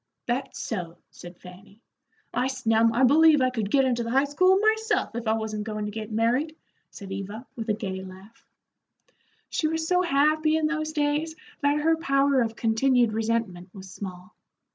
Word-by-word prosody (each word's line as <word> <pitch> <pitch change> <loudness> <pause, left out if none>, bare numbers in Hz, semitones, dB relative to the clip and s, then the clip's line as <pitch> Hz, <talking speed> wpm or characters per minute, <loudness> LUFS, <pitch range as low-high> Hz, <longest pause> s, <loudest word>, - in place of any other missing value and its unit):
"That's 255 +2 -3
so," 175 -6 -5
said 175 0 -12
Fanny. 195 +3 -15 0.5
"I 255 - 0
snum, 230 -4 +2
I 240 +3 +1
believe 305 +3 +6
I 255 -1 +2
could 220 -5 -3
get 270 +3 +3
into 245 -2 0
the 230 - -4
high 265 +3 +3
school 370 +7 +3
myself, 440 - +1
if 235 0 -5
I 220 - +3
wasn't 220 -1 -3
goin' 215 -1 -4
to 210 - -4
git 220 +1 -7
married," 245 +8 0 0.3
said 195 -2 -11
Eva, 200 +5 -6
with 225 -1 -6
a 210 - +2
gay 190 -3 -5
laugh. 190 +4 -14 1.1
She 310 - 0
was 320 0 -2
so 360 +1 +3
happy 310 -1 +2
in 315 - 0
those 310 0 -2
days 300 +2 -1 0.3
that 290 +1 +2
her 325 +1 +2
power 275 -3 +2
of 225 -1 -2
continued 235 0 +2
resentment 220 -5 -2
was 190 -1 -10
small. 185 -2 -9
240 Hz, 180 wpm, -25 LUFS, 215-295 Hz, 1.1 s, believe